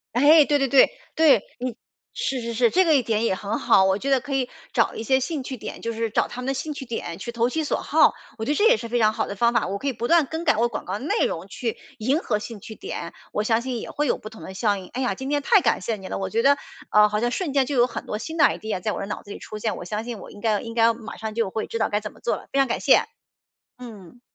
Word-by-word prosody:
哎， 295 +4 +7
对 290 - +2
对 275 -1 +1
对， 270 0 +6 0.2
对。 285 -10 +5 0.2
你 250 -2 -3 0.4
是 265 -1 -2
是 235 0 -4
是， 235 +1 +3
这 375 0 +4
个 320 -2 +4
一 265 - +3
点 220 0 0
也 190 - +1
很 205 +3 -3
好， 190 - +5
我 190 0 +3
觉 270 +6 -3
得 270 -2 +3
可 275 +3 -6
以 260 -2 0 0.2
找 - - +1
一 220 - -4
些 265 +3 +3
兴 270 +2 -3
趣 260 0 -6
点， - - -8
就 230 - -2
是 225 0 -2
找 - - +1
他 250 - -6
们 250 - -5
的 270 - +1
兴 300 +3 -4
趣 275 - -7
点 225 -8 -5
去 235 +4 -6
投 235 +1 +1
其 315 +3 -2
所 - - -1
好， - - +4 0.2
我 220 - -4
觉 285 - 0
得 - - +1
这 415 - +3
也 - - +5
是 230 - -6
非 240 - -1
常 215 -2 +4
好 220 0 -2
的 200 - -5
方 235 +3 +3
法。 235 -2 +1
我 195 +2 -2
可 275 +7 -2
以 - - 0
不 235 -1 -3
断 335 0 +5
更 320 +4 -5
改 295 - +4
我 235 +2 +2
广 - - -5
告 185 - -4
的 - - -9
内 360 - +1
容 165 +2 -3
去 230 +2 -3 0.2
迎 255 +5 +1
合 210 - -1
兴 210 -1 -8
趣 220 - -9
点， 170 -3 -6 0.2
我 210 - 0
相 225 +1 +2
信 250 -3 -4
也 - - -7
会 295 +1 -1
有 - - +1
不 215 - -9
同 220 - -13
的 190 - -8
效 205 +1 +1
应。 185 -1 -9
哎 255 - -2
呀， 250 - +1
今 265 0 -5
天 290 0 +1
太 410 +8 +5
感 - - +1
谢 225 -2 -2
你 190 -1 -9
了， - - -3
我 190 -1 -3
觉 225 +3 +1
得， 280 +3 +5 0.3
呃， 210 0 +6
好 210 0 -1
像 240 +2 +1
瞬 305 +5 -2
间 270 -1 +3
就 285 - -3
有 240 -1 +5
很 250 - -6
多 210 - -3
新 320 +9 -6
的 295 - +6
idea 215 -7 -1
在 210 +3 -1
我 - - -4
的 - - -3
脑 205 - -5
子 205 - -12
里 - - -6
出 215 - -8
现， 215 0 -2
我 - - -7
相 210 +5 -4
信 240 -2 -5
我 - - -11
应 - - -12
该 210 -1 +1
应 230 0 -7
该 230 0 +4
马 225 -1 -9
上 220 -1 -5
就 230 -4 0
会 220 +2 -3
知 - - -4
道 220 - +1
该 210 - 0
怎 210 0 -8
么 - - -20
做 - - 0
了， - - -14
非 - - 0
常 270 - +4
感 - - -1
谢。 - - +5 0.7
嗯。 230 -3 -12
235 Hz, 350 characters per minute, -24 LUFS, 215-270 Hz, 0.7 s, 哎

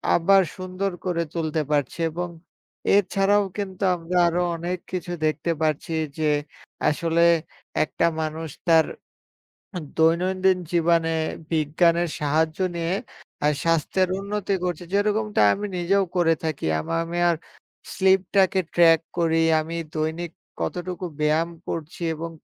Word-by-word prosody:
আবার 195 +3 +5 0.2
সুন্দর 185 +1 -3
করে 170 -2 0
তুলতে 160 -2 -1
পারছে 145 +1 0
এবং 175 +2 -3 0.7
এছাড়াও 200 +1 +3
কিন্তু 200 -1 -4
আমরা 175 +1 -3
আরো 170 +1 +1
অনেক 175 +2 -3
কিছু 180 -1 -4
দেখতে 155 +2 0
পাচ্ছি। 155 +1 0 0.3
যে 155 -1 +2 0.6
আসলে 165 +2 +1 0.6
একটা 160 +2 0
মানুষ 160 +1 -4 0.2
তার 165 -1 +6 1.1
দৈনন্দিন 185 +3 +3
জীবনে 165 -1 +2 0.4
বিজ্ঞানের 170 +3 +2
সাহায্য 155 +3 0 0.2
নিয়ে 170 +1 -1 0.5
আ - - +5 0.2
স্বাস্থ্যের 165 +3 +1
উন্নতি 200 0 -2
করছে, 180 -2 -2
যেরকমটা 210 - +1
আমি 205 - -4
নিজেও 195 +3 +2
করে 165 -2 +4
থাকি 160 -3 -2
আমা 80 - -3
আমি 170 +1 -5
আর 170 - +2 0.6
স্লিপটাকে 190 0 +3
ট্র্যাক 165 -2 +6 0.2
করি, 165 -1 +2 0.2
আমি 165 +2 -4 0.2
দৈনিক 160 +2 -2 0.3
কতটুকু 180 +1 -3
ব্যায়াম 155 +2 +2 0.2
করছি 165 +1 -5
এবং 165 +2 -5
170 Hz, 120 wpm, -24 LUFS, 160-185 Hz, 1.1 s, তার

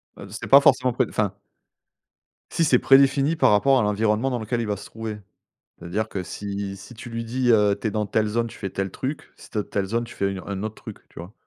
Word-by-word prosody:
Heu, 100 - -10
c'est 105 - -7
pas 140 +1 +8
forcément 130 -3 +3
préd 125 -2 0
enfin 105 -3 -1 1.2
si, 165 - +1
c'est 130 -5 +4
prédéfini 140 +3 +4
par 155 - +4
rapport 135 +6 +4
à - - +2
l'environnement 105 +4 +1
dans 125 -2 -2
lequel 115 +2 -2
il 115 - -3
va 105 - -1
se 100 - -10
trouver, 110 -1 -6 0.6
c'est-à-dire 90 +6 -3
que 95 - -4
si 100 +1 -5
si 100 - -12
tu 120 +1 -10
lui 115 0 -4
dis: 125 +2 -1
«Heu, 105 -2 +4
tu 110 - -2
es - - -2
dans 105 0 -1
telle 110 +1 0
zone, 115 +2 -1
tu - - -12
fais 95 - -4
tel 95 0 -3
truc. 135 +8 -5
Si - - -15
tu - - -6
es - - +2
dans - - -21
telle 100 -1 -1
zone, 115 +4 -1
tu 120 - -10
fais 100 - 0
une 95 - -5
au - - -15
un 100 -1 -4
autre 110 0 -4
truc», - - -10
tu - - -13
vois? 90 +6 -9
110 Hz, 265 wpm, -24 LUFS, 100-125 Hz, 1.2 s, pas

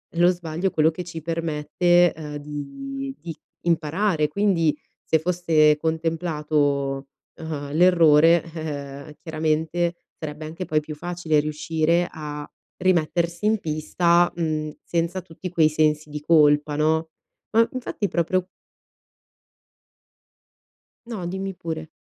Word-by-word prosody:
lo 175 +1 +5
sbaglio 175 +1 -2
quello 155 +1 +3
che 180 +3 -6
ci 165 -1 -7
permette, 165 +2 +2
uhm, 150 -2 -6
di 270 - -6
di 165 -3 -7 0.3
imparare; 165 0 +1
quindi 165 -4 +2 0.3
se 160 - +2
fosse 160 -3 +3
contemplato, 150 -4 -1 0.3
uhm, 145 -3 -6
l'errore, 165 -1 +6
eh-eh, 145 -2 -6
chiaramente, 160 +1 -1 0.2
sarebbe 155 0 -6
anche 165 +4 -6
poi 155 0 +1
più 150 0 -7
facile 170 -1 0
riuscire 160 +3 0
a 150 -1 -7 0.3
rimettersi 170 0 +1
in 215 -1 +3
pista, 170 +3 +2
mhmm, 155 -3 -2
senza 170 +2 -1
tutti 180 +1 -8
quei 165 -3 +4
sensi 155 0 +1
di 150 0 -6
colpa, 150 -2 +4
no. 160 +1 +1 0.4
Ma 230 +1 +4
infatti 240 -5 -3
proprio 180 +2 0 2.6
No, 215 -7 -5
dimmi 190 +2 -4
pure. 160 -3 -6
160 Hz, 115 wpm, -24 LUFS, 150-175 Hz, 2.6 s, l'errore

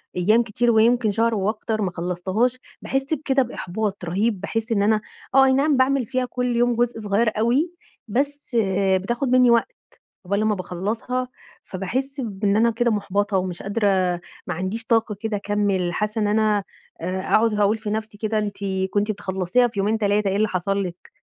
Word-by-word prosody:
أيام 215 +6 +3
كتير 235 +2 +1
ويمكن 225 0 +3
شهر 230 +2 +1
وأكتر 215 +2 -1
ما 190 -3 0
خلصتهاش، 185 +8 -1 0.2
باحس 270 +3 -1
بكده 275 -3 +1
بإحباط 205 -4 -4
رهيب، 195 +3 0
باحس 225 +3 -3
إن 210 -3 +2
أنا 215 +1 +3 0.3
آه، 270 0 +7
أي 265 - +4
نعم 280 +1 +3
باعمل 260 0 +2
فيها 255 +3 -1
كل 250 -1 -2
يوم 240 0 +2
جزء 240 0 0
صغير 215 +2 +1
أوي، 250 +10 +2 0.4
بس 280 +3 -2 0.4
بتاخد 235 +8 -1
مني 250 -1 +5
وقت 235 - +3 0.5
عقبال 200 +2 0
لمَّا 215 0 +1
باخلَّصها، 215 +8 -3 0.4
فباحس 260 +9 -3
بإن 200 -2 -1
أنا 230 +2 +4
كده 235 +1 +1
مُحبطة 200 -1 0
ومش 180 -2 -3
قادرة، 205 +2 0 0.6
ما - - -1
عنديش 190 +7 -4
طاقة 225 -2 +1
كده 220 -1 -2
أكمِّل، 200 -3 0
حاسَّة 210 +3 -1
إن 210 - +2
أنا 210 -1 +2 0.4
آآ، 185 +2 -2
أقعد 220 +3 +2
هاقول 210 +1 +2
في 220 -1 -5
نفسي 220 0 -4
كده 215 +1 -1
أنتِ 205 -1 -3 0.3
كنتِ 205 +2 +1
بتخلَّصيها 195 +4 +1
في 220 -4 -6
يومين، 210 +3 +1
3، 205 -1 +1
إيه 190 - -1
اللي 215 +2 +2
حصل 195 +1 -1
لِك! 180 -1 -10
215 Hz, 175 wpm, -23 LUFS, 200-240 Hz, 0.6 s, آه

